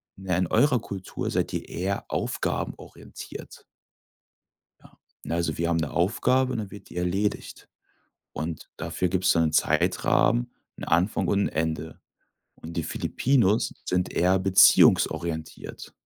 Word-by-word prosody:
„Na 95 -1 -7
ja, - - +2
in 90 -1 +1
eurer 125 - +3
Kultur 100 -4 -5
seid - - -1
ihr - - -4
eher 95 +3 -3
aufgabenorientiert.“ - - -5 1.2
Ja, - - -20 0.3
ne, 85 - -3
also, 85 -2 -1
wir 85 0 0
haben 85 - +1
'ne 80 -3 -2
Aufgabe, 130 +8 +1
dann 105 -4 -4
wird 100 - -12
die - - -10
erledigt. 95 +4 -2 0.6
Und 80 +2 -5
dafür 90 - -2
gibt's 90 0 +2
dann 85 - +3
'nen 80 - -1
Zeitrahmen, - - +2 0.3
'n - - -10
Anfang 90 +5 +1
und 100 - +2
'n - - -1
Ende. 80 0 -3 0.6
Und 85 +1 -10
die 85 - 0
Filipinos 115 - +1
sind 90 0 -1
eher 90 +2 +3
beziehungsorientiert. 85 -3 +3
90 Hz, 140 wpm, -26 LUFS, 85-100 Hz, 1.2 s, eurer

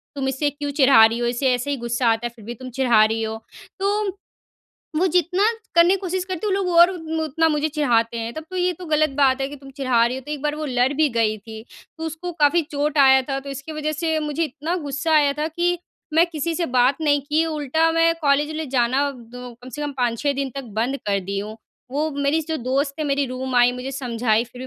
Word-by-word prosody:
"तुम 270 -1 -2
इसे 270 +3 0
क्यों 290 0 -5
चिढ़ा 260 -5 +7
रही 225 +1 0
हो? 240 - 0
इसे 250 +2 +1
ऐसे 250 +3 -2
ही 280 - -1
गुस्सा 240 0 -1
आता 225 +1 -1
है, - - -10
फिर 220 -3 -14
भी 235 - -5
तुम 255 - -6
चिढ़ा 240 -5 +5
रही 225 +1 -1
हो।" 220 0 -3 0.4
तो, 400 0 -1 0.8
वो 355 +4 +3
जितना 360 +2 +2 0.3
करने 340 +2 +6
की - - +1
कोशिश 370 -1 -2
करती 370 +2 -4
है, - - +1
वो - - +2
लोग 390 -2 -1
और 345 +2 +8
मु 320 0 -3
उतना 320 +2 +1
मुझे 300 0 0
चिढ़ाते 240 -6 +1
हैं। 230 0 -4
तब 315 - -6
तो 370 - -5
ये 360 0 +1
तो 360 +1 -10
गलत 310 -1 +2
बात 265 -1 +4
है 270 - -1
कि, 290 - -9
"तुम 275 -1 -13
चिढ़ा 260 -4 +2
रही 245 +2 -2
हो।" 265 - -7
तो - - -7
एक 290 -2 -5
बार 300 0 0
वो 305 0 -5
लड़ 250 0 +1
भी 305 +1 +3
गई 225 -2 +1
थी, 220 +1 -10 0.4
तो 320 - -5
उसको 320 +3 -5
काफ़ी 300 +4 +4
चोट 295 -1 -2
आया 265 -1 +6
था। 270 -1 -1
तो 280 +1 -8
इसकी 275 +3 -7
वज़ह 305 0 -2
से 320 +1 -1
मुझे 300 +2 -1
इतना 305 +4 -4
गुस्सा 285 +4 -1
आया 295 -2 +4
था 305 +1 0
कि, 350 +2 0 0.4
मैं 330 +2 +5
किसी 330 -1 -3
से 345 - -1
बात 250 0 +3
नहीं 290 -2 +2
की, 300 +3 +1
उल्टा 315 +1 +1
मैं 330 0 +3
कॉलेज 295 0 +2
ले 315 0 -3
जाना 260 +3 +2
द 245 0 -11
कम 250 - -10
से 295 +3 -6
कम 290 -1 -3
5-6 245 +3 0
दिन 275 -1 -3
तक 275 -1 -5
बंद 250 +5 0
कर 200 -1 +1
दी 195 +1 -4
हूँ। 210 +2 -6 0.3
वो 300 +4 -1
मेरी 285 +2 0
जो 320 - -1
दोस्त 275 +2 -1
है, - - 0
मेरी 280 0 +1
रूम 255 +1 -5
आई, 245 0 +5
मुझे 250 +2 -6
समझाई, 235 -4 0
फिर 250 +1 -10
280 Hz, 250 wpm, -22 LUFS, 250-315 Hz, 0.8 s, और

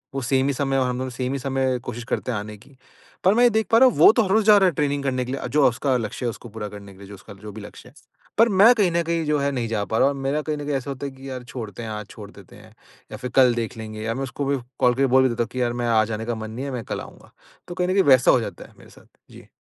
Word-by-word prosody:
वो 135 - -2
सेम 130 +2 +1
ही 140 - 0
समय 135 0 -1
और 130 -1 +1
हम 125 0 -2
दोनों 130 +1 -3
सेम 125 +1 -3
ही 140 - -3
समय 130 -1 -1
कोशिश 120 0 -6
करते 125 - -2
हैं 115 - -2
आने 105 +1 -8
की। 130 +6 -21 0.5
पर 190 - +5
मैं 240 +3 +3
ये 245 - +7
देख 220 -1 0
पा 225 - +6
रहा 260 +2 +7
हूँ - - -6
वो - - +8
तो 230 - +3
हर 195 - -4
रोज़ 215 +2 +2
जा 210 -1 +7
रहा 195 -1 +4
है - - -3
ट्रेनिंग 145 -1 -1
करने 130 -2 -1
के 125 - -6
लिए, 135 - -4
जो 145 -2 +4
उसका 130 +2 -1
लक्ष्य 115 +2 -5
है - - +1
उसको 115 +1 -9
पूरा 105 -1 -6
करने 100 -1 -11
के 95 - -19
लिए। 100 - -12
जो 100 - -11
उसका 100 - -13
जो 105 +2 -11
भी 105 +2 -10
लक्ष्य 105 +4 -12
है। 130 - -25 0.4
पर 230 +2 +5
मैं 205 +4 +6
कहीं 200 -6 +2
न 170 0 +1
कहीं 165 0 -1
जो 150 0 +1
है 140 0 0
नहीं 125 -4 -2
जा 110 -2 -2
पा 110 - -2
रहा 135 - +4
हूँ। 140 - -1
और 135 - -7
मेरा 140 +3 -1
कहीं 150 0 -3
न 145 - -6
कहीं 145 -1 -1
ऐसा 135 +1 -4
होता 135 +1 -6
है 140 - -5
कि 135 +1 -11
यार 130 -1 -6
छोड़ते 120 -3 -8
हैं, 110 - -6
आज 105 -1 -5
छोड़ 105 -2 -11
देते 100 -4 -16
हैं 105 +1 -17 0.4
या 110 - -6
फिर 125 +2 -6
कल 130 -2 +6
देख 115 0 -4
लेंगे 110 -1 -7
या 115 +1 -2
मैं 135 - -3
उसको 140 +2 -4
भी 140 0 0 0.2
कॉल 125 -1 +4
करके 135 +2 +1
बोल 130 - +6
भी 130 - +3
देता 120 0 -1
हूँ - - -7
कि 130 - -3
यार 120 -1 0
मैं - - 0
आज 110 -2 +3
जाने 110 0 -4
का 120 0 -2
मन 110 0 -7
नहीं 125 +5 -5
है, 140 - -4
मैं 125 -3 -4
कल - - -4
आऊँगा। - - -14 0.4
तो 175 - -7
कहीं 180 -1 -1
न 185 - 0
कहीं 195 0 +4
वैसा 130 -4 +5
हो - - +4
जाता - - -7
है - - -19
मेरे - - -17
साथ। - - -19 0.2
जी। - - -14
130 Hz, 350 wpm, -23 LUFS, 115-140 Hz, 0.5 s, वो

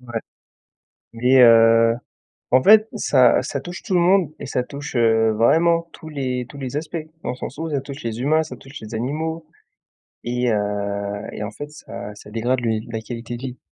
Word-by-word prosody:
Ouais 120 -3 -5 0.9
mais 125 +3 +5
heu, 115 -1 +6 0.6
en 130 +1 +5
fait 215 +2 +7
ça 130 - +4
ça 140 - -4
touche 175 +4 -8
tout 195 - -2
le 175 - +4
monde 175 -3 +3
et - - -7
ça 125 - -1
touche, 140 +3 -8
heu, 110 -1 +3
vraiment 165 +9 +3
tous 160 - -11
les 130 -4 -3
tous 140 - -12
les 130 0 -5
aspects 155 +2 -3 0.3
dans - - -1
le 125 - -3
sens 140 - -7
où 165 - -3
ça 140 - 0
touche 140 +2 -9
les 115 0 -3
humains, 155 +4 +2
ça 155 - -8
touche 135 +2 -11
les 110 +1 -9
animaux 155 +8 -3 0.8
et 125 0 0
heu 100 0 -2
et - - -7
en 105 - -5
fait 145 +7 -8
ça 105 -8 -9
ça 105 - -13
dégrade 120 +3 0
le 120 - -3
ni 110 +1 -2
la 110 - -3
qualité 120 +1 -6
de - - -12
vie. 125 -1 -5
125 Hz, 205 wpm, -21 LUFS, 115-150 Hz, 0.9 s, fait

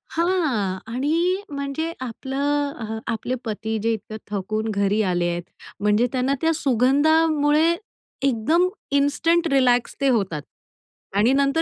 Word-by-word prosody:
हां 310 - +1 0.2
आणि 335 +9 +1
म्हणजे 280 +3 -3
आपलं, 270 -1 -2
आपले 235 +2 -2
पती 220 0 -3
जे 230 - +2
इतकं 215 0 -6
थकून 215 +2 -2
घरी 200 +1 +1
आले 175 -3 0
आहेत. 175 0 -3 0.4
म्हणजे 210 +4 +3
त्यांना 260 +1 +1
त्या 325 0 +3
सुगंधामुळे 300 +4 +3 0.5
एकदम 275 +7 +2 0.3
इन्स्टंट 330 +4 +2
रिलॅक्स 250 -3 +3
ते 275 - +3
होतात. 195 - 0 0.7
आणि 215 +5 +4
नंतर 280 +3 +2
265 Hz, 120 wpm, -23 LUFS, 220-305 Hz, 0.7 s, आणि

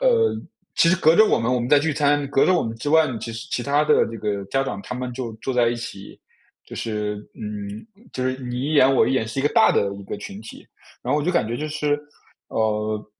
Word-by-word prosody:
呃， 470 -3 +3 0.4
其 165 - +4
实 185 - +4
隔 160 0 +4
着 215 - +7
我 - - +2
们 115 +2 0
我 125 - +1
们 120 - -3
在 145 +1 +6
聚 155 +1 0
餐， 145 0 +2
隔 135 - +3
着 185 - +4
我 175 - +2
们 115 0 -4
之 135 +6 -4
外 160 0 +5
呢， 125 -4 -4
其 115 - -5
实 115 +1 -7
其 120 - -1
他 145 +3 +2
的 - - +4
这 115 - -7
个 105 -2 -2
家 135 +7 0
长 105 -6 -4
他 125 - -6
们 125 0 -4
就 120 -2 -5
坐 135 - -2
在 120 -2 +3
一 120 - -1
起， 100 -4 -9 0.5
就 - - -11
是 105 -2 -3 0.2
嗯， 105 - -7 0.3
就 130 - -2
是 130 0 -1
你 125 0 -4
一 150 - -1
言 135 -3 +5
我 - - +4
一 - - +1
言， 110 -4 0
是 115 - -5
一 135 - +1
个 145 - +3
大 - - +5
的 100 0 +1
一 100 - -9
个 - - -5
群 100 +2 -8
体。 110 - -12 0.4
然 - - -1
后 150 - +2
我 - - -3
就 180 - +2
感 110 - +2
觉 115 - -3
就 155 +3 -4
是 150 -1 -1 0.5
呃， 110 -1 -1
125 Hz, 290 characters per minute, -23 LUFS, 110-145 Hz, 0.5 s, 着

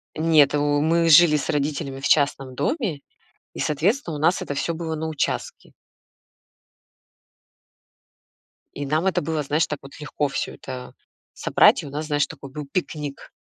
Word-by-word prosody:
Нет, 155 -3 +4
у 145 0 +1
мы 165 +1 +2
жили 155 -1 +7
с 140 - -4
родителями 145 -1 -2
в 135 - -2
частном 140 -3 +1
доме, 200 - -1 0.5
и, - - -9
соответственно, 170 - 0
у - - -5
нас 170 +4 +2
это 145 - -4
всё 170 +4 -1
было 160 -1 -4
на 160 +1 -3
участке. 155 -3 -3 3.0
И 145 - -5
нам 155 +5 0
это 190 - +1
было, 155 0 -2
знаешь, 150 +3 +1
так 150 - -4
вот 135 +2 -13
легко 150 -1 -2
всё 135 - -4
это 125 -1 -8 0.4
собрать, - - +4
и - - -8
у - - -7
нас, 150 +2 -5
знаешь, 145 -1 +1
такой 140 -4 -11
был 150 0 -6
пикник. 150 -6 -4
150 Hz, 160 wpm, -23 LUFS, 145-160 Hz, 3.0 s, жили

